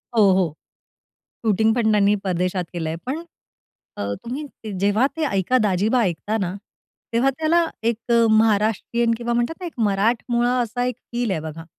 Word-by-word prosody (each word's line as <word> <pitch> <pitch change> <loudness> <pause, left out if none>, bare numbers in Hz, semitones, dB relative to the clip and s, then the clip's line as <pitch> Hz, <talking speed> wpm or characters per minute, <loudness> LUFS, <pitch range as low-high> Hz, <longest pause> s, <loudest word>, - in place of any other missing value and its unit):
हो, 205 -3 +6
हो. 180 -5 +1 0.9
शूटिंगपण 220 +2 +3
त्यांनी 205 0 +4
परदेशात 180 0 -1
केलंय, 160 -2 -3
पण, 300 +6 -3 0.7
अ, 100 0 -2
तुम्ही 270 +6 -5 0.3
जेव्हा 205 +6 +3
ते 320 - 0
"ऐका 200 0 +1
दाजीबा" 210 +5 +2
ऐकता 205 +4 -1
ना, 180 -1 -2 0.6
तेव्हा 240 +4 +3
त्याला 330 +2 +3 0.2
एक 230 -1 +1
अ, 235 0 +5
महाराष्ट्रीयन, 220 +2 +2
किंवा 240 0 -2
म्हणतात 240 +7 0
ना, - - -4
एक 335 - -6
मराठमोळा 235 +4 +1
असा 245 +2 -2
एक 250 -2 -2 0.2
फील 235 -3 -1
आहे, 165 - 0
बघा. 160 +1 -7
220 Hz, 155 wpm, -22 LUFS, 190-240 Hz, 0.9 s, हो